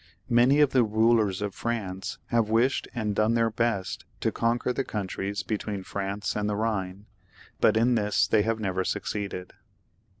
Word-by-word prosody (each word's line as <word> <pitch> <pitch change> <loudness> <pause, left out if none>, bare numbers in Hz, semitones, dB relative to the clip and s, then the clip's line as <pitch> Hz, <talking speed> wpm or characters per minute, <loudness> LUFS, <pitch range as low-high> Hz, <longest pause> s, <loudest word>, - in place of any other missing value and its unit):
Many 125 +5 +5
of 145 -2 +4
the 130 -2 +4
rulers 110 -2 +2
of. 100 -2 -3
France 95 -5 -4
have 115 -3 +2
wished 120 +4 +2
and 110 -3 -1
done 110 +3 +2
their 115 -1 +2
best 110 -4 -1 0.2
to - - +1
conquer 120 +2 0
the 135 - -1
countries 100 -1 -3
between 105 -2 -3
France 100 +1 -3
and 105 0 -1
the 105 - -1
Ehine, 100 -3 -2 0.5
but 110 - +4
in 120 +2 +3
this 105 -3 +2
they 110 - +3
have 110 +1 0
never 95 -3 -1
succeeded. 100 -2 -4
110 Hz, 165 wpm, -27 LUFS, 100-115 Hz, 0.5 s, Many